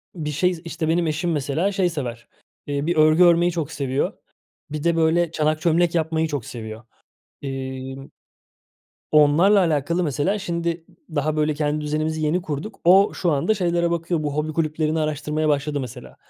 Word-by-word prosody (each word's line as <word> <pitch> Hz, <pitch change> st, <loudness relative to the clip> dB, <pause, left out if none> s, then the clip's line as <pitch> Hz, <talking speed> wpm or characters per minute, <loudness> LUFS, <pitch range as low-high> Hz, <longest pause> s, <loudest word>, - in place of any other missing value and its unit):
bir 150 Hz, -3 st, -4 dB
şey, 175 Hz, +2 st, 0 dB
işte, 160 Hz, -1 st, -3 dB
benim 170 Hz, 0 st, +1 dB
eşim 160 Hz, +3 st, -1 dB
mesela 150 Hz, +6 st, 0 dB
şey 185 Hz, -2 st, +1 dB
sever, 120 Hz, -7 st, -5 dB, 0.4 s
eee, 145 Hz, 0 st, -2 dB
bir 170 Hz, -, 0 dB
örgü 155 Hz, +3 st, +5 dB
örmeyi 175 Hz, 0 st, +5 dB
çok 165 Hz, -4 st, -3 dB
seviyor, 135 Hz, -1 st, -1 dB, 0.6 s
bir 150 Hz, 0 st, -4 dB
de, 170 Hz, -1 st, +2 dB
böyle, 165 Hz, +1 st, +2 dB
çanak 155 Hz, 0 st, 0 dB
çömlek 170 Hz, 0 st, +2 dB
yapmayı 160 Hz, 0 st, 0 dB
çok 145 Hz, -6 st, -4 dB
seviyor. 110 Hz, -1 st, -8 dB, 0.6 s
İmm, 135 Hz, 0 st, -6 dB, 1.0 s
onlarla 155 Hz, +7 st, +5 dB
alakalı 170 Hz, +1 st, +1 dB
mesela, 165 Hz, +8 st, 0 dB
şimdi, 170 Hz, -2 st, -3 dB, 0.3 s
daha 150 Hz, +2 st, 0 dB
böyle 150 Hz, 0 st, +2 dB
kendi 150 Hz, 0 st, -1 dB
düzenimizi 155 Hz, +1 st, -2 dB
yeni 170 Hz, +5 st, +1 dB
kurduk. 160 Hz, +6 st, -6 dB
O, 195 Hz, +4 st, +6 dB
şu 175 Hz, -3 st, 0 dB
anda 145 Hz, +10 st, +2 dB
şeylere 175 Hz, -3 st, 0 dB
bakıyor, 165 Hz, -1 st, -1 dB
bu 145 Hz, -1 st, -2 dB
hobi 155 Hz, +1 st, -2 dB
kulüplerini 155 Hz, 0 st, 0 dB
araştırmaya 155 Hz, 0 st, -1 dB
başladı 145 Hz, 0 st, 0 dB
mesela. 125 Hz, -1 st, -8 dB
155 Hz, 160 wpm, -22 LUFS, 145-170 Hz, 1.0 s, O